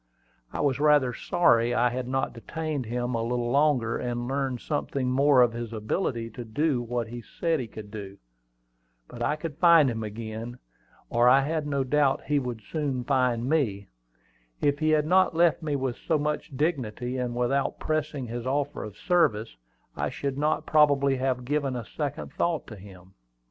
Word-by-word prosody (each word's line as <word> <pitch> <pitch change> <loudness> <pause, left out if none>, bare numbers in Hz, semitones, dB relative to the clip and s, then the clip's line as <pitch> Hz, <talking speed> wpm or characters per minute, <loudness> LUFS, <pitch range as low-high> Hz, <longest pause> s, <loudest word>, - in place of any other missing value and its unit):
I - - -3
was 140 -2 +1
rather 145 -4 +4
sorry 120 -7 +2
I 120 0 +3
had 125 0 -3
not 135 +1 -1
detained 150 +2 -4
him 120 +2 -2
a 115 - 0
little 120 +1 -1
longer, 140 -5 +2
and 120 -1 -3
learned 135 -2 -1
something 135 -3 -2
more 135 -1 +5
of 120 -1 +1
his 120 -1 -5
ability 115 - -2
to 120 - -7
do 130 +4 0
what 120 -1 -3
he 120 +1 -7
said 165 +7 -1
he 125 - -4
could 105 -1 -10
do. 100 -2 -8 0.9
But 120 - -10
I 135 +5 +1
could 155 0 -7
find 165 -6 +6
him 115 -1 -4
again; 110 +2 -6 0.5
or 120 +1 +5
I 135 +2 +6
had 155 +1 -2
no 140 -2 0
doubt 140 0 +2
he 150 -1 +1
would 120 -4 -5
soon 140 -4 -2
find 125 -2 +1
me. 115 -10 0 0.7
If 145 0 +1
he 155 0 +1
had 155 -1 +3
not 185 +1 +3
left 170 0 +3
me 150 -3 -1
with 130 -3 -2
so 160 - 0
much 150 -1 -3
dignity, 125 -5 -1
and 125 -1 -2
without 130 +3 0
pressing 155 -3 -2
his 120 +1 -5
offer 145 +2 -1
of 105 -1 -9
service, 115 - +1 0.4
I - - -1
should 140 -1 -3
not 150 +2 0
probably 140 -3 +4
have 130 -1 -1
given 140 -1 -1
a 120 -3 -4
second 145 +3 -5
thought 170 -3 -1
to 110 - -10
him. 95 -2 -14
130 Hz, 180 wpm, -27 LUFS, 120-150 Hz, 0.9 s, find